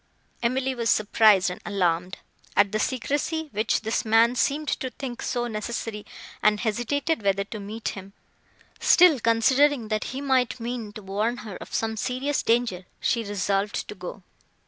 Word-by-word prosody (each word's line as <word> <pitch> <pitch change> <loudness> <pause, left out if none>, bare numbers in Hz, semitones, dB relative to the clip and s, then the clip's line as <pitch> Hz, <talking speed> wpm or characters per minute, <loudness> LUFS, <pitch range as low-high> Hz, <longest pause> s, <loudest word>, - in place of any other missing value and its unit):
Emily 260 +2 0
was 235 -3 -1
surprised 210 -3 +4
and 180 - -8
alarmed, 180 -3 0 0.4
at 200 -1 +5
the 215 - -1
secrecy 290 +6 -1
which 215 +2 0
this 220 +1 -1
man 225 +2 +4
seemed 285 +5 0
to 260 - -2
think 250 0 -7
so 240 -2 -1
necessary, 220 -1 -4 0.3
and 210 0 +3
hesitated 240 +7 -1
whether 200 -1 +1
to 210 +2 -8
meet 215 +3 -5
him, 195 0 -9 0.7
till, 350 -6 +6
considering, 235 +2 +3
that 215 -1 -1
he 260 - -5
might 260 -3 +1
mean 235 -2 -4
to 215 - -9
warn 210 +5 -1
her 205 -4 -7
of - - -11
some 220 0 -1
serious 260 +5 -1
danger, 225 -6 0
she 230 -2 0
resolved 200 0 -1
to - - -6
go. 185 0 -8
225 Hz, 160 wpm, -25 LUFS, 205-255 Hz, 0.7 s, till